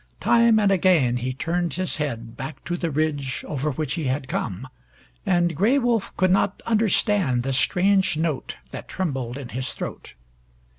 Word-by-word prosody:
Time 230 Hz, -1 st, +4 dB
and 205 Hz, -2 st, +3 dB
again 170 Hz, -10 st, +3 dB
he 125 Hz, +1 st, -2 dB
turned 170 Hz, +6 st, -2 dB
his 185 Hz, 0 st, -2 dB
head 115 Hz, -6 st, -4 dB
back 135 Hz, +6 st, -7 dB
to 175 Hz, +3 st, -2 dB
the 170 Hz, -1 st, -2 dB
ridge 145 Hz, -2 st, -1 dB
over 150 Hz, 0 st, -2 dB
which 145 Hz, 0 st, -2 dB
he 160 Hz, -, -3 dB
had 130 Hz, +1 st, -1 dB
come, 115 Hz, -1 st, -3 dB, 0.6 s
and 175 Hz, -2 st, +2 dB
Gray 220 Hz, -, +3 dB
Wolf 240 Hz, -5 st, +1 dB
could 185 Hz, -1 st, +3 dB
not 195 Hz, +1 st, +2 dB
understand 205 Hz, -, +2 dB
the 135 Hz, +1 st, -1 dB
strange 185 Hz, +5 st, +2 dB
note 155 Hz, -4 st, -2 dB
that -, -, -7 dB
trembled 135 Hz, -9 st, -3 dB
in 135 Hz, -4 st, -7 dB
his 130 Hz, +1 st, -3 dB
throat. -, -, -7 dB
155 Hz, 165 wpm, -24 LUFS, 130-185 Hz, 0.6 s, Time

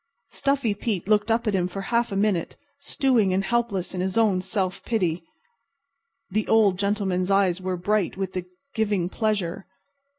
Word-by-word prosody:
Stuffy 275 Hz, -6 st, 0 dB
Pete 200 Hz, -3 st, -3 dB
looked 210 Hz, +1 st, +2 dB
up 230 Hz, +1 st, +1 dB
at 215 Hz, -, +1 dB
him 180 Hz, -2 st, +1 dB
for 195 Hz, +2 st, -6 dB
a 195 Hz, -, -8 dB
half 235 Hz, -1 st, +2 dB
minute, 195 Hz, -3 st, 0 dB, 0.2 s
stewing 245 Hz, -9 st, +2 dB
and 195 Hz, -, +1 dB
helpless 205 Hz, -5 st, -1 dB
in 180 Hz, -, -2 dB
his 190 Hz, +3 st, -2 dB
own 205 Hz, -5 st, +3 dB
self 190 Hz, 0 st, -2 dB
pity. 180 Hz, -8 st, -1 dB, 1.1 s
The 215 Hz, +2 st, 0 dB
Old 205 Hz, -5 st, +4 dB
Gentleman's 200 Hz, -3 st, 0 dB
eyes 195 Hz, -2 st, +2 dB
were 185 Hz, -1 st, -2 dB
bright 200 Hz, +1 st, 0 dB
with 190 Hz, -1 st, -3 dB
the 185 Hz, -1 st, -3 dB, 0.3 s
giving 205 Hz, -5 st, 0 dB
pleasure. 200 Hz, -5 st, -2 dB
200 Hz, 165 wpm, -25 LUFS, 185-220 Hz, 1.1 s, Old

